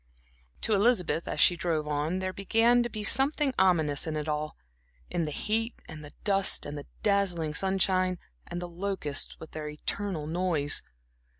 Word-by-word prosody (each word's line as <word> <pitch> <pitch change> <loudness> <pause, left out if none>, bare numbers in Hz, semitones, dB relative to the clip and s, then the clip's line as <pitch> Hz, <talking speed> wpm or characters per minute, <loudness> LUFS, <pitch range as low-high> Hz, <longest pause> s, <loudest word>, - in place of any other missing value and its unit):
To 220 - +1
Elizabeth, 200 -6 +2
as - - -3
she 175 - +6
drove 160 -3 -1
on, 150 +4 -1
there 185 0 -3
began 225 +5 +3
to 240 - -1
be 215 -1 -5
something 275 +4 +4
ominous 160 -6 +2
in 155 - -2
it 150 0 -3
all; 150 0 -2 0.5
in 170 -2 0
the - - -3
heat 225 +9 -1
and 155 -2 -9
the 145 - -10
dust 195 -2 +2
and 145 - -5
the 145 - -8 0.2
dazzling 185 -7 +1
sunshine 185 0 +1 0.3
and 175 - -4
the 175 - -5
locusts 175 -5 -2
with 160 - -10
their 155 -1 -5
eternal 160 +2 -3
noise. 160 -3 0
180 Hz, 170 wpm, -29 LUFS, 155-200 Hz, 0.5 s, she